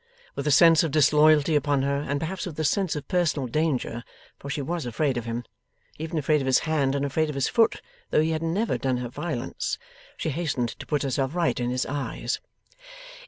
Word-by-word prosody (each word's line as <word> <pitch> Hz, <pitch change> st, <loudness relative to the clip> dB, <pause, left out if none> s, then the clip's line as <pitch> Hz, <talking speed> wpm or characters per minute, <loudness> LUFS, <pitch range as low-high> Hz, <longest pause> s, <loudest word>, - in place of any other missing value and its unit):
With 140 Hz, -, -4 dB
a -, -, +3 dB
sense 165 Hz, +2 st, +7 dB
of 165 Hz, -, 0 dB
disloyalty 150 Hz, +1 st, +4 dB
upon 145 Hz, -2 st, +2 dB
her, 140 Hz, 0 st, +1 dB
and 140 Hz, 0 st, -2 dB
perhaps 180 Hz, +5 st, -4 dB
with 160 Hz, -3 st, -7 dB
a -, -, +1 dB
sense 180 Hz, +4 st, +1 dB
of 150 Hz, -, -6 dB
personal 170 Hz, -7 st, +1 dB
danger 130 Hz, -4 st, -1 dB, 0.4 s
for 140 Hz, -, -8 dB
she 145 Hz, -, -2 dB
was 165 Hz, -1 st, -3 dB
afraid 135 Hz, +4 st, 0 dB
of 120 Hz, -2 st, -3 dB
him 115 Hz, +1 st, -3 dB, 0.6 s
even 160 Hz, +1 st, -3 dB
afraid 150 Hz, 0 st, +2 dB
of 135 Hz, -, -3 dB
his 130 Hz, -, +5 dB
hand 145 Hz, -4 st, +1 dB
and 140 Hz, 0 st, 0 dB
afraid 155 Hz, +3 st, 0 dB
of 150 Hz, -, -4 dB
his 140 Hz, -, +1 dB
foot, 230 Hz, -1 st, +2 dB, 0.3 s
though -, -, +3 dB
he 160 Hz, +1 st, +1 dB
had 160 Hz, 0 st, -1 dB
never 180 Hz, +8 st, 0 dB
done 130 Hz, -2 st, 0 dB
her 125 Hz, -1 st, -4 dB
violence 170 Hz, +8 st, -3 dB, 0.4 s
she 160 Hz, -, -2 dB
hastened 135 Hz, -6 st, -1 dB
to -, -, -9 dB
put 150 Hz, -2 st, 0 dB
herself 135 Hz, +2 st, -1 dB
right 170 Hz, -6 st, +1 dB
in 120 Hz, 0 st, -1 dB
his 125 Hz, 0 st, -1 dB
eyes. 145 Hz, 0 st, -3 dB
150 Hz, 210 wpm, -26 LUFS, 135-160 Hz, 0.6 s, sense